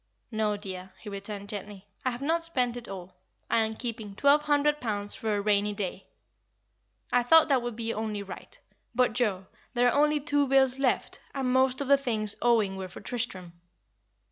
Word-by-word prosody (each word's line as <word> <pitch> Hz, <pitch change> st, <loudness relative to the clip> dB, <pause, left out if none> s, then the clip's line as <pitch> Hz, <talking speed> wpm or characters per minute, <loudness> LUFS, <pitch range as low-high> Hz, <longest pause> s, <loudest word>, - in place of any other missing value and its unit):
"No, 215 Hz, -2 st, 0 dB
dear," 190 Hz, -2 st, -7 dB
he 210 Hz, -, -8 dB
returned, 200 Hz, 0 st, -6 dB
gently, 205 Hz, -1 st, -7 dB, 0.2 s
"I 255 Hz, -, +2 dB
have 245 Hz, +2 st, -5 dB
not 330 Hz, +3 st, +1 dB
spent 250 Hz, -8 st, 0 dB
it 240 Hz, -1 st, -7 dB
all. 185 Hz, -2 st, -8 dB, 0.4 s
I -, -, +4 dB
am 220 Hz, 0 st, 0 dB
keeping 220 Hz, -4 st, -5 dB
twelve 285 Hz, +5 st, +5 dB
hundred 295 Hz, 0 st, +2 dB
pounds 205 Hz, -3 st, -2 dB
for 220 Hz, -4 st, -1 dB
a 205 Hz, -, 0 dB
rainy 205 Hz, 0 st, +2 dB
day. 195 Hz, -1 st, -4 dB, 1.1 s
I 245 Hz, -, +5 dB
thought 320 Hz, +7 st, +6 dB
that 265 Hz, -3 st, +3 dB
would 240 Hz, -1 st, -4 dB
be 230 Hz, 0 st, -2 dB
only 215 Hz, -2 st, -3 dB
right. 195 Hz, -, -10 dB, 0.4 s
But, 250 Hz, -2 st, +3 dB
Joa, 210 Hz, -6 st, 0 dB, 0.3 s
there 245 Hz, 0 st, +4 dB
are 285 Hz, -, +3 dB
only 300 Hz, 0 st, +2 dB
two 290 Hz, -1 st, +1 dB
bills 265 Hz, -1 st, +3 dB
left, 265 Hz, -2 st, 0 dB, 0.2 s
and 260 Hz, -2 st, 0 dB
most 260 Hz, +1 st, +3 dB
of 280 Hz, -, -2 dB
the 280 Hz, 0 st, +6 dB
things 220 Hz, -6 st, 0 dB
owing 220 Hz, -5 st, +3 dB
were 190 Hz, -1 st, -5 dB
for 180 Hz, -, -10 dB
Tristram." 190 Hz, -8 st, -4 dB
230 Hz, 190 wpm, -28 LUFS, 205-265 Hz, 1.1 s, thought